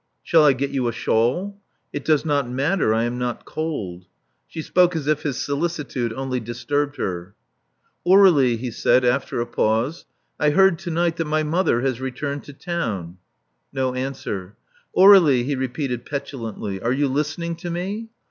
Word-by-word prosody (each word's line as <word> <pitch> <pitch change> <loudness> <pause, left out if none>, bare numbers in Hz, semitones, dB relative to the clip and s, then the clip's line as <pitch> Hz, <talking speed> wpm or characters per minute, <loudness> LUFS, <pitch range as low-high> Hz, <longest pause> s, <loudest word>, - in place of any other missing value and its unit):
'* - - -51
Shall 165 -3 +4
I 145 -2 +6
get 135 +2 -3
you 130 -3 0
a - - 0
shawl?" 155 - 0 0.3
It 145 - -4
does 155 -1 +2
not 145 -4 0
matter: 140 - +1
I 110 +1 +2
am 120 +1 -2
not 125 -1 -3
cold." 95 - -5 0.4
She 160 - -6
spoke 180 +1 +3
as 155 -4 -2
if 155 0 +1
his 140 -5 -2
solicitude 140 -5 -2
only 130 0 -3
disturbed 145 +5 -2
her. 90 +2 -4 0.7
Aur61ie," 175 -11 +6
he 120 +1 -4
said, 125 +3 +2
after 125 0 0
a 120 - 0
pause: 115 +9 -1 0.3
'*I 150 - +3
heard 190 +1 +4
to 175 -1 -6
night 170 0 0
that 165 - -1
my 155 +1 0
mother 155 -6 +1
has 130 -2 -1
returned 140 +2 -4
to - - -10
town." 110 - -4 0.5
No 130 -1 -1
answer. 125 -8 -5 0.4
Aur61ie," 180 -11 +7
he 140 +1 -1
repeated 130 -1 -3
petulantly. 115 -8 -5
"Are 120 - 0
you 145 +2 +1
listening 155 +5 -2
to 175 - -6
me?" 195 +6 -4
140 Hz, 170 wpm, -22 LUFS, 120-160 Hz, 0.7 s, Aur61ie